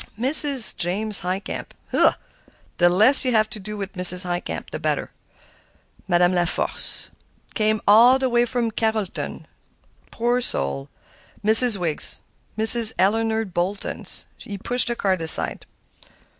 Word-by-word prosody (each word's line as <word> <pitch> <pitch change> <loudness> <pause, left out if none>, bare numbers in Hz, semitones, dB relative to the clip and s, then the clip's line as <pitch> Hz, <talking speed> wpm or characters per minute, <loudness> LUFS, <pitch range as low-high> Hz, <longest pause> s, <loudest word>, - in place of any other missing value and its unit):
'Mrs. 270 -1 +5
James 200 +4 -2
Highcamp.' 185 +3 -7 0.2
Hugh! - - +2 0.7
the 175 0 +3
less 215 +10 +3
you 255 -2 -2
have 215 -1 +1
to 215 - -8
do 210 +2 -10
with 195 -1 -8
Mrs. 180 0 +5
Highcamp, 175 0 -7
the - - -7
better. - - -5 1.0
'Madame 175 -1 +1
Laforcé.' 175 -1 -3 0.4
Came 215 0 -1
all 235 +5 +4
the 265 0 -3
way 240 -1 0
from 235 -1 -4
Carrolton, 220 -3 -5
too, - - -22 0.6
poor 240 +1 -3
old 250 - -3
soul. 70 - -3 0.5
'Miss 220 +1 +4
Wiggs,' 170 -4 +2 0.4
'Mrs. 220 +1 +8
Eleanor 225 +3 -1
Boltons.'" 185 +1 -7
He 200 - -10
pushed 245 +6 -1
the 240 - -2
cards 190 -5 -3
aside. 160 0 +1
215 Hz, 135 wpm, -20 LUFS, 180-235 Hz, 1.0 s, Mrs